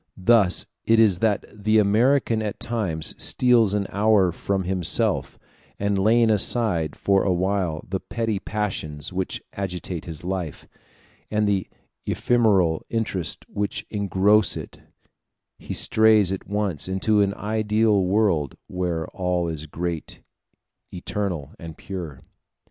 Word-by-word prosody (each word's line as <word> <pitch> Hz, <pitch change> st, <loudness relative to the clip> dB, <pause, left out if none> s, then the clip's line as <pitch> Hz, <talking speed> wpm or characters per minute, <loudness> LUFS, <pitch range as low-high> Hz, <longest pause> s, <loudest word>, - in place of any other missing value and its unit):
Thus 95 Hz, -2 st, +4 dB, 0.2 s
it 115 Hz, 0 st, +3 dB
is 100 Hz, -6 st, +4 dB
that 105 Hz, -2 st, +1 dB
the 110 Hz, +1 st, +1 dB
American 115 Hz, +3 st, +3 dB
at 105 Hz, -2 st, -4 dB
times 95 Hz, -10 st, -1 dB
steals 120 Hz, -5 st, +3 dB
an 100 Hz, -1 st, 0 dB
hour 100 Hz, -2 st, +3 dB
from 95 Hz, +3 st, -2 dB
himself; 90 Hz, -2 st, 0 dB, 0.4 s
and 100 Hz, 0 st, 0 dB
laying 110 Hz, +3 st, +3 dB
aside 105 Hz, -6 st, +1 dB
for 100 Hz, -1 st, +2 dB
a 95 Hz, -, +1 dB
while 90 Hz, -3 st, -1 dB
the 95 Hz, +1 st, -2 dB
petty 115 Hz, -2 st, -3 dB
passions 90 Hz, -8 st, -4 dB
which 95 Hz, 0 st, -3 dB
agitate 90 Hz, -3 st, -5 dB
his 80 Hz, -2 st, -7 dB
life, 90 Hz, -4 st, -4 dB, 0.6 s
and 105 Hz, 0 st, +1 dB
the 100 Hz, -2 st, 0 dB, 0.4 s
ephemeral 100 Hz, -9 st, +2 dB
interests 105 Hz, -7 st, -3 dB
which 100 Hz, 0 st, -3 dB
engross 100 Hz, +1 st, +2 dB
it, -, -, -9 dB, 0.8 s
he -, -, -9 dB
strays 110 Hz, -3 st, +4 dB
at 95 Hz, -, -5 dB
once 100 Hz, -7 st, -1 dB
into 105 Hz, +3 st, +1 dB
an 100 Hz, 0 st, 0 dB
ideal 110 Hz, -1 st, +1 dB
world, 90 Hz, -7 st, +1 dB
where 90 Hz, -3 st, -3 dB
all 90 Hz, -2 st, -1 dB
is 80 Hz, -1 st, -5 dB
great, 85 Hz, +1 st, -5 dB, 0.7 s
eternal, 90 Hz, -5 st, -4 dB
and 80 Hz, -2 st, -9 dB
pure. 85 Hz, -8 st, -7 dB
100 Hz, 125 wpm, -23 LUFS, 90-110 Hz, 0.8 s, Thus